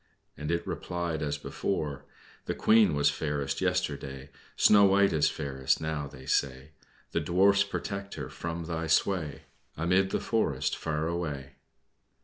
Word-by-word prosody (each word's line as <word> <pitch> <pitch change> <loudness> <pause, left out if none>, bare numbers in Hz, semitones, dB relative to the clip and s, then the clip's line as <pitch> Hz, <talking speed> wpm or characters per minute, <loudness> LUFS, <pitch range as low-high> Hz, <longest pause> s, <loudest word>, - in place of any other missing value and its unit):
and 75 0 -5
it 85 0 0
replied 85 -3 -3
as 75 -1 -1
before: 75 -2 -3 0.4
"The - - -2
Queen 110 -8 +4
was 75 0 +3
fairest 70 -2 -2
yesterday; 65 0 -2 0.2
Snow 100 -1 +6
White 100 0 +4
is 75 -1 +3
fairest 65 -3 -1
now, 80 -2 -3
they 65 -2 -12
say. 65 +2 -1 0.4
The - - +1
Dwarfs 95 +5 +4
protect 100 0 -5
her - - -5
from 85 0 -5
thy 80 -1 -3
sway 80 -4 +1 0.3
Amid 90 +4 +2
the - - 0
forest, 80 - 0
far 80 -1 -2
away." 75 -6 -4
80 Hz, 140 wpm, -29 LUFS, 70-90 Hz, 0.4 s, Snow